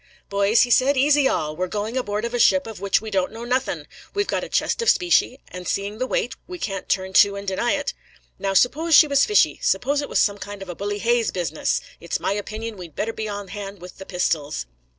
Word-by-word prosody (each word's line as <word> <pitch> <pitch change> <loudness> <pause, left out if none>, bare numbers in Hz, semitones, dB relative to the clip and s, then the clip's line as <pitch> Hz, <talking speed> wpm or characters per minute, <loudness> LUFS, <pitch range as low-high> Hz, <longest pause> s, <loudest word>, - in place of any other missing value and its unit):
"Boys," 200 +3 +4
he 245 - -2
said, 270 +3 +4
"easy 285 +1 +4
all! 155 -10 -1
We're 185 +3 -2
going 210 +5 -3
aboard 210 -4 -2
of 235 - -4
a 245 - -1
ship 280 +4 +4
of 225 -3 -8
which 200 0 +2
we 220 0 -7
don't 190 -2 0
know 225 +1 -8
nothing; 255 +2 -1 0.3
we've 405 0 +1
got - - -2
a - - -6
chest - - 0
of 465 - +3
specie, 345 -7 +3
and 180 0 -8
seeing 200 +2 -2
the 255 - -1
weight, 245 - -1
we 360 - -7
can't 195 - -4
turn 190 0 -1
to 200 +1 +6
and 200 0 -7
deny 195 +5 0
it. 285 -1 -2 0.5
Now, 195 0 -1
suppose 310 - +4
she 310 - +9
was 280 -1 +3
fishy; 420 - +3
suppose 290 - +1
it 285 - -6
was - - -1
some 205 -1 +2
kind 205 -1 -7
of 190 - -12
a 175 - -5
Bully 205 +2 -3
Hayes 235 +1 +1
business! 165 -4 -1 0.2
It's 170 - -3
my - - -1
opinion 215 +2 -5
we'd 170 -4 -10
better 225 +2 -2
be 220 -1 -4
on 205 -2 -6
hand 200 -1 -7
with 180 +2 -12
the 190 - -9
pistols." 155 - -1
210 Hz, 240 wpm, -23 LUFS, 195-255 Hz, 0.5 s, she